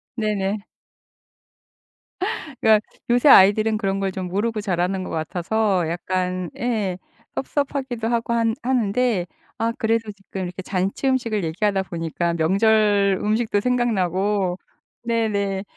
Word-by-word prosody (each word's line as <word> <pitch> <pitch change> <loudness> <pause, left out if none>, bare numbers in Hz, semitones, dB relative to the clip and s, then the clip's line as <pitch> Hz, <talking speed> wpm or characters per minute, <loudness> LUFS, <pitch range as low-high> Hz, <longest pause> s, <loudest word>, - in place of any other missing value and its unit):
네네. 210 -2 -1 2.0
그러니까 215 -1 +5 0.3
요새 245 +4 +4
아이들은 215 +1 +6
그런 195 -2 -1
걸 195 -1 -1
좀 185 -1 -4
모르고 215 +4 -1
자라는 185 -1 -1
것 - - -6
같아서 180 +3 0
약간 180 0 -2
예, 215 -7 -1 0.4
섭섭하기도 265 -4 -2
하고 235 0 0
한 230 -1 +1
하는데 240 -5 +1 0.3
아 230 +1 +1
그래도 225 -1 0
지금 195 -1 -8
이렇게 180 +1 -6
잔치 195 +8 -1
음식을 230 -7 0
얘기하다 195 +4 0
보니까 170 -1 -2
명절 200 +3 +3
음식도 215 0 +1
생각나고 200 -5 0 0.5
네네. 205 -4 0
205 Hz, 275 characters per minute, -22 LUFS, 185-225 Hz, 2.0 s, 아이들은